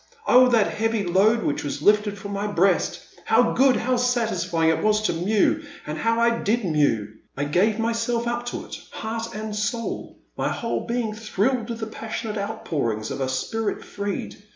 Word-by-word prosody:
Oh, 255 Hz, +1 st, +7 dB
that 230 Hz, -4 st, +4 dB
heavy 225 Hz, -1 st, 0 dB
load 200 Hz, +6 st, +3 dB
which 145 Hz, -, -1 dB
was 145 Hz, 0 st, -4 dB
lifted 210 Hz, 0 st, +3 dB
from 200 Hz, +1 st, -6 dB
my 200 Hz, +1 st, -2 dB
breast! 195 Hz, -2 st, +1 dB, 0.2 s
How -, -, +4 dB
good, 265 Hz, -1 st, +4 dB
how 255 Hz, +2 st, +1 dB
satisfying 185 Hz, -10 st, +1 dB
it 160 Hz, -, -1 dB
was 215 Hz, 0 st, +2 dB
to -, -, +1 dB
mew! 205 Hz, -, +2 dB, 0.2 s
And 150 Hz, -, -4 dB
how 230 Hz, +6 st, +1 dB
I 235 Hz, 0 st, +3 dB
did 220 Hz, +1 st, 0 dB
mew! 145 Hz, -, +2 dB, 0.3 s
I 140 Hz, -, 0 dB
gave 185 Hz, +9 st, +2 dB
myself 230 Hz, +1 st, 0 dB
up 240 Hz, 0 st, -2 dB
to -, -, -4 dB
it, -, -, -8 dB
heart 225 Hz, +1 st, -5 dB
and 215 Hz, 0 st, -4 dB
soul; 230 Hz, +3 st, -3 dB, 0.2 s
my -, -, -1 dB
whole 230 Hz, -, -3 dB
being 235 Hz, -2 st, -1 dB
thrilled 225 Hz, +3 st, -1 dB
with 230 Hz, -1 st, -5 dB
the -, -, -1 dB
passionate 220 Hz, -1 st, -5 dB
outpour 175 Hz, -, -2 dB
ings 110 Hz, 0 st, -5 dB
of -, -, -4 dB
a 130 Hz, -, 0 dB
spirit 205 Hz, +12 st, -2 dB
freed. 200 Hz, -1 st, -5 dB
215 Hz, 185 wpm, -24 LUFS, 190-230 Hz, 0.3 s, Oh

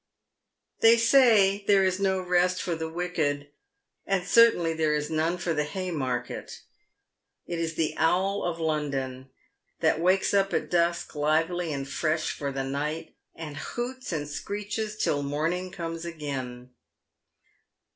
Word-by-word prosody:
They 230 Hz, +1 st, +7 dB
say 225 Hz, -5 st, +5 dB
there 200 Hz, -1 st, +5 dB
is 185 Hz, 0 st, +1 dB
no 190 Hz, -1 st, +1 dB
rest 180 Hz, 0 st, +2 dB
for 175 Hz, -, -2 dB
the 160 Hz, 0 st, -4 dB
wicked, 160 Hz, -4 st, -2 dB, 0.6 s
and 195 Hz, -2 st, 0 dB
certainly 225 Hz, -8 st, +5 dB
there 155 Hz, -1 st, +1 dB
is 150 Hz, +1 st, -2 dB
none 160 Hz, +3 st, 0 dB
for 175 Hz, -1 st, -1 dB
the 150 Hz, -1 st, 0 dB
Haymarket; 150 Hz, -8 st, -4 dB, 0.8 s
it 170 Hz, -1 st, -4 dB
is 165 Hz, -1 st, -2 dB
the 160 Hz, -1 st, 0 dB
owl 190 Hz, +5 st, +1 dB
of 170 Hz, -1 st, -2 dB
Loudon, 135 Hz, -5 st, -2 dB, 0.5 s
that -, -, +2 dB
wakes 185 Hz, +4 st, +2 dB
up 195 Hz, -1 st, +2 dB
at -, -, -2 dB
dusk 170 Hz, 0 st, +1 dB
lively 160 Hz, +3 st, 0 dB
and 140 Hz, -1 st, -4 dB
fresh 155 Hz, +3 st, -1 dB
for 140 Hz, -1 st, -4 dB
the 135 Hz, 0 st, -3 dB
night, 145 Hz, +4 st, -4 dB, 0.2 s
and 150 Hz, -3 st, -7 dB
hoots 245 Hz, -, -5 dB
and 150 Hz, -3 st, -2 dB
screeches 210 Hz, +6 st, -4 dB
till 145 Hz, -8 st, +1 dB
morning 160 Hz, +6 st, -1 dB
comes 165 Hz, -2 st, -5 dB
again. 135 Hz, -7 st, -6 dB
165 Hz, 140 wpm, -27 LUFS, 150-185 Hz, 0.8 s, They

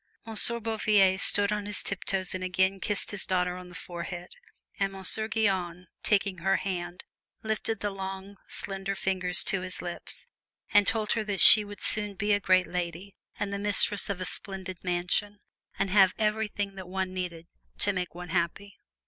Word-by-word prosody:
Monsieur 230 Hz, +1 st, +3 dB
Bouvier 210 Hz, -4 st, +2 dB
stood 205 Hz, 0 st, +4 dB
on 210 Hz, -1 st, -3 dB
his 210 Hz, -, -1 dB
tiptoes 190 Hz, -1 st, -2 dB
and 185 Hz, 0 st, -4 dB
again 190 Hz, +1 st, +1 dB
kissed 205 Hz, +1 st, -3 dB
his 205 Hz, -2 st, -1 dB
daughter 180 Hz, -1 st, 0 dB
on 180 Hz, 0 st, -10 dB
the 175 Hz, -, -13 dB
forehead, 175 Hz, +1 st, -7 dB, 0.5 s
and 195 Hz, -1 st, 0 dB
Monsieur 195 Hz, +3 st, -1 dB
Guyon, 190 Hz, -5 st, -1 dB, 0.2 s
taking 200 Hz, -3 st, 0 dB
her 190 Hz, +3 st, +1 dB
hand, 180 Hz, -2 st, -4 dB, 0.4 s
lifted 220 Hz, 0 st, -2 dB
the 205 Hz, -, -2 dB
long, 195 Hz, +1 st, -7 dB
slender 195 Hz, 0 st, -4 dB
fingers 185 Hz, -2 st, 0 dB
to 195 Hz, -, -1 dB
his 185 Hz, 0 st, -6 dB
lips, 175 Hz, -1 st, -2 dB, 0.5 s
and 205 Hz, -2 st, +5 dB
told 220 Hz, -2 st, 0 dB
her 225 Hz, -, 0 dB
that 200 Hz, -2 st, -3 dB
she 215 Hz, -, +12 dB
would 205 Hz, 0 st, -11 dB
soon 210 Hz, -1 st, -3 dB
be 205 Hz, +2 st, 0 dB
a 205 Hz, -, +2 dB
great 185 Hz, -2 st, +3 dB
lady 180 Hz, +2 st, -5 dB, 0.3 s
and 200 Hz, -1 st, -3 dB
the 200 Hz, -, -3 dB
mistress 205 Hz, 0 st, +1 dB
of 200 Hz, -2 st, -3 dB
a 185 Hz, -, -3 dB
splendid 190 Hz, -1 st, -5 dB
mansion, 180 Hz, +3 st, -1 dB, 0.4 s
and 195 Hz, -, -1 dB
have 195 Hz, -2 st, +5 dB
everything 210 Hz, -2 st, -1 dB
that 190 Hz, -2 st, -10 dB
one 190 Hz, 0 st, -3 dB
needed 175 Hz, -3 st, -5 dB, 0.3 s
to 200 Hz, -, +2 dB
make 180 Hz, -2 st, -4 dB
one 180 Hz, 0 st, -8 dB
happy. 175 Hz, +3 st, -3 dB
195 Hz, 175 wpm, -28 LUFS, 180-205 Hz, 0.5 s, she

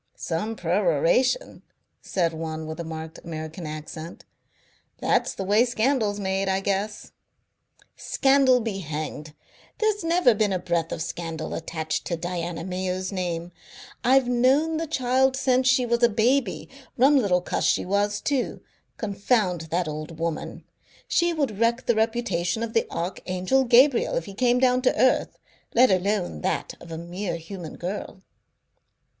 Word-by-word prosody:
"Some 210 Hz, +7 st, -3 dB
peroration," 185 Hz, -, +1 dB, 0.4 s
said 170 Hz, -3 st, 0 dB
one 160 Hz, 0 st, -5 dB
with 160 Hz, +1 st, -6 dB
a -, -, -2 dB
marked 160 Hz, 0 st, -7 dB
American 160 Hz, 0 st, -6 dB
accent. 155 Hz, +2 st, -8 dB, 0.7 s
"That's -, -, +1 dB
the 195 Hz, -, -4 dB
way 205 Hz, +4 st, +4 dB
scandal's 235 Hz, -3 st, 0 dB
made, 195 Hz, 0 st, -1 dB
I 190 Hz, 0 st, +1 dB
guess." 200 Hz, +2 st, -2 dB, 0.8 s
"Scandal 270 Hz, -2 st, +3 dB
be 215 Hz, -4 st, -3 dB
hanged! 155 Hz, -2 st, -5 dB, 0.4 s
There's 430 Hz, -3 st, 0 dB
never 330 Hz, -6 st, +4 dB
been 210 Hz, -2 st, +1 dB
a -, -, +1 dB
breath 170 Hz, -2 st, -1 dB
of -, -, -2 dB
scandal 165 Hz, -2 st, -5 dB
attached 160 Hz, -1 st, -3 dB
to 170 Hz, -, -2 dB
Diana 170 Hz, -1 st, -4 dB
Mayo's 185 Hz, +1 st, -3 dB
name. 175 Hz, -2 st, -3 dB, 0.5 s
I've 260 Hz, +1 st, +4 dB
known 265 Hz, +6 st, +3 dB
the 325 Hz, 0 st, -2 dB
child 265 Hz, -2 st, +2 dB
since 260 Hz, -1 st, +2 dB
she 255 Hz, -1 st, +4 dB
was 235 Hz, 0 st, 0 dB
a 235 Hz, -, +6 dB
baby. 235 Hz, +1 st, +1 dB, 0.3 s
Rum 270 Hz, +4 st, +5 dB
little 195 Hz, -8 st, +3 dB
cuss -, -, -2 dB
she -, -, +2 dB
was, 205 Hz, +2 st, 0 dB
too. 275 Hz, -4 st, -1 dB, 0.4 s
Confound 200 Hz, -5 st, 0 dB
that 175 Hz, +1 st, 0 dB
old 155 Hz, +1 st, -6 dB
woman! 165 Hz, -1 st, -4 dB, 0.4 s
She 345 Hz, 0 st, +2 dB
would 280 Hz, -11 st, -2 dB
wreck 235 Hz, +2 st, +1 dB
the 240 Hz, -, +3 dB
reputation 220 Hz, -4 st, 0 dB
of 225 Hz, -1 st, -4 dB
the 225 Hz, -, +2 dB
Archangel 185 Hz, +8 st, -1 dB
Gabriel 250 Hz, +2 st, +4 dB
if 165 Hz, -, -1 dB
he 200 Hz, -, -9 dB
came 245 Hz, +3 st, +2 dB
down 250 Hz, 0 st, +3 dB
to 255 Hz, -, +1 dB
earth, 260 Hz, -, +2 dB, 0.4 s
let 250 Hz, 0 st, +6 dB
alone 185 Hz, -, 0 dB
that -, -, -2 dB
of 170 Hz, -, -12 dB
a 160 Hz, -, -4 dB
mere 175 Hz, +2 st, -4 dB
human 165 Hz, 0 st, -8 dB
girl." 185 Hz, +1 st, -6 dB
195 Hz, 150 wpm, -25 LUFS, 170-250 Hz, 0.8 s, a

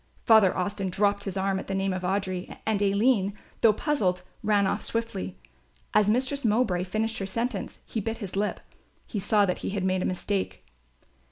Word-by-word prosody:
Father 220 Hz, -5 st, +6 dB
Austin 195 Hz, +1 st, -1 dB
dropped 200 Hz, +2 st, +1 dB
his 195 Hz, -1 st, -3 dB
arm 190 Hz, 0 st, +1 dB
at -, -, -8 dB
the 195 Hz, -, -2 dB
name 195 Hz, 0 st, 0 dB
of 185 Hz, -, -3 dB
Audry; 185 Hz, -1 st, -2 dB
and 215 Hz, -2 st, +1 dB
Aline, 200 Hz, 0 st, +2 dB, 0.2 s
though 225 Hz, -, +7 dB
puzzled, 200 Hz, -, 0 dB, 0.2 s
ran 210 Hz, -2 st, +3 dB
off 205 Hz, +2 st, 0 dB
swiftly. 225 Hz, -, -3 dB, 0.6 s
As 210 Hz, -1 st, +4 dB
Mistress 260 Hz, +5 st, +1 dB
Mowbray 210 Hz, -5 st, +2 dB
finished 220 Hz, +4 st, -1 dB
her 195 Hz, -, -3 dB
sentence, 230 Hz, +1 st, -3 dB
he 225 Hz, -, -3 dB
bit 225 Hz, +3 st, -3 dB
his 200 Hz, -5 st, -6 dB
lip; 205 Hz, +1 st, -1 dB, 0.4 s
he 210 Hz, -, -4 dB
saw 205 Hz, +1 st, +3 dB
that 180 Hz, -, -1 dB
he -, -, -3 dB
had 195 Hz, -1 st, -2 dB
made 185 Hz, 0 st, +1 dB
a -, -, -1 dB
mistake. 185 Hz, -, -2 dB
200 Hz, 185 wpm, -27 LUFS, 190-220 Hz, 0.6 s, though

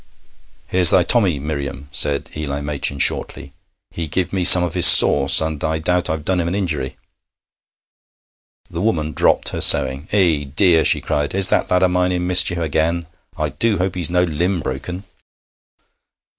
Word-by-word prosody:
'Here's 90 Hz, -3 st, +5 dB
thy 90 Hz, -, +4 dB
Tommy, 95 Hz, -6 st, 0 dB
Miriam,' 70 Hz, -1 st, -8 dB
said 70 Hz, 0 st, -1 dB
Eli 70 Hz, -2 st, -6 dB
Machin 70 Hz, -1 st, -3 dB
shortly. 70 Hz, 0 st, -2 dB, 0.4 s
'He 85 Hz, -1 st, -8 dB
give 90 Hz, +5 st, -4 dB
me 95 Hz, -2 st, -3 dB
some 90 Hz, 0 st, +8 dB
of 90 Hz, -, -5 dB
his 90 Hz, -1 st, +7 dB
sauce, 70 Hz, -1 st, +6 dB
and 80 Hz, -2 st, -6 dB
I 80 Hz, 0 st, -3 dB
doubt 90 Hz, +2 st, -3 dB
I've 80 Hz, -1 st, -6 dB
done 95 Hz, -1 st, -2 dB
him 85 Hz, -, -4 dB
an 90 Hz, -, -5 dB
injury.' 80 Hz, -9 st, -6 dB, 1.7 s
The 85 Hz, 0 st, -8 dB
woman 80 Hz, -8 st, -3 dB
dropped -, -, -1 dB
her -, -, -7 dB
sewing. 65 Hz, +4 st, +3 dB
'Eh, 85 Hz, -8 st, -1 dB
dear!' 85 Hz, -3 st, +1 dB
she -, -, +3 dB
cried, 75 Hz, +3 st, -5 dB
'is 95 Hz, -1 st, +5 dB
that -, -, -2 dB
lad 90 Hz, 0 st, -1 dB
o' -, -, +2 dB
mine 90 Hz, 0 st, -3 dB
in 90 Hz, -1 st, -5 dB
mischief 90 Hz, -1 st, +3 dB
again? 85 Hz, +1 st, -4 dB, 0.3 s
I -, -, -4 dB
do 115 Hz, -3 st, -3 dB
hope 90 Hz, +1 st, -4 dB
he's 90 Hz, -4 st, -4 dB
no 90 Hz, 0 st, -1 dB
limb 90 Hz, +2 st, -4 dB
brokken.' 75 Hz, +8 st, -8 dB
85 Hz, 170 wpm, -16 LUFS, 75-90 Hz, 1.7 s, some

